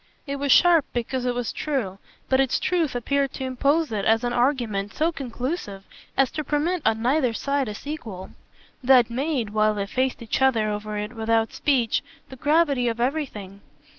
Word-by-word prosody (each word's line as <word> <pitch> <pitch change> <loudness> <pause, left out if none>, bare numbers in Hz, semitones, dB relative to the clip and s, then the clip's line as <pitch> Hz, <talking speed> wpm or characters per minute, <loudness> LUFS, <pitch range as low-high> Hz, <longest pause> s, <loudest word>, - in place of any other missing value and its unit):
It 280 -1 -4
was 280 0 0
sharp 340 -2 +6
because 245 +1 -2
it 245 - 0
was 245 -2 -2
true, 235 -11 -3 0.3
but 265 - +2
its 270 -2 +2
truth 335 -7 0
appeared 275 +3 0
to - - -5
impose 280 +4 +1
it 205 -2 -2
as 225 +3 +3
an 240 0 -1
argument 240 -6 0
so 320 +2 +1
conclusive 250 - -5 0.3
as 270 -2 +3
to 305 - -3
permit 310 +5 0
on 220 0 +1
neither 255 -1 +2
side 280 +2 -1
a 210 - -5
sequel. 225 -10 -7 0.5
That 250 -2 +5
made, 260 -3 -1
while 215 0 +2
they 200 -1 -2
faced 255 +3 -1
each 225 - -2
other 230 -5 +3
over 210 0 -4
it 210 +2 -4
without 225 0 0
speech, 255 -6 +1 0.3
the 265 - -9
gravity 290 -2 +2
of 230 0 -2
everything. 235 -8 -3
250 Hz, 180 wpm, -24 LUFS, 220-280 Hz, 0.5 s, sharp